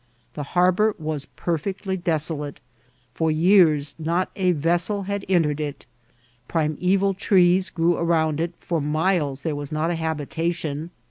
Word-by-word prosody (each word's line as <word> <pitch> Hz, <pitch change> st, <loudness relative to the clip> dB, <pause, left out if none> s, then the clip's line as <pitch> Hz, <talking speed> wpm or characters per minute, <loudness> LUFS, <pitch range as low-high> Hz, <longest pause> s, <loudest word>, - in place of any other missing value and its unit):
The 150 Hz, -, -5 dB, 0.2 s
harbour 185 Hz, +4 st, +3 dB
was 155 Hz, -3 st, -4 dB
perfectly 190 Hz, +3 st, -3 dB
desolate; 160 Hz, -4 st, -2 dB, 0.5 s
for 160 Hz, +4 st, 0 dB
years 155 Hz, -3 st, +4 dB
not 170 Hz, +4 st, -1 dB
a 185 Hz, -2 st, +2 dB
vessel 175 Hz, +5 st, 0 dB
had 200 Hz, +1 st, -3 dB
entered 155 Hz, -5 st, +2 dB
it; 150 Hz, -2 st, -5 dB, 0.6 s
primeval 180 Hz, +5 st, +1 dB
trees 185 Hz, -1 st, +3 dB
grew 165 Hz, +2 st, +1 dB
around 160 Hz, -3 st, +1 dB
it; 170 Hz, +1 st, -1 dB
for 165 Hz, -3 st, -2 dB
miles 150 Hz, -2 st, 0 dB
there 160 Hz, -3 st, -1 dB
was 145 Hz, 0 st, -6 dB
not 155 Hz, +2 st, 0 dB
a -, -, 0 dB
habitation. 160 Hz, 0 st, -3 dB
165 Hz, 135 wpm, -23 LUFS, 155-180 Hz, 0.6 s, years